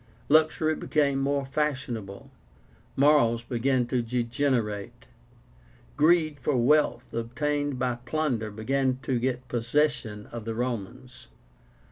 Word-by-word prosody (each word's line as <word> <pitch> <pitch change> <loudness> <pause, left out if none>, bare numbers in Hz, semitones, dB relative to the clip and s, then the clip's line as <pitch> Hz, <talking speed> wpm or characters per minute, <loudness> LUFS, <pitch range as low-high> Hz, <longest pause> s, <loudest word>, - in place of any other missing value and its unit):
Luxury 155 +1 +3
became 145 -3 0
more 140 0 0
fashionable; 130 -8 -3 0.6
morals 135 -5 +4
began 125 +1 0
to 125 +1 0
degenerate. 115 -3 -2 0.9
Greed 155 -1 +3
for 135 0 0
wealth 150 +6 +2
obtained 145 +4 -2
by 125 -1 -1
plunder 130 -7 -1
began 130 +5 0
to 130 -3 0
get 125 +1 -2
possession 120 -3 0
of 115 -2 -6
the 115 -1 -3
Romans. 125 +1 -5
130 Hz, 105 wpm, -27 LUFS, 115-145 Hz, 0.9 s, morals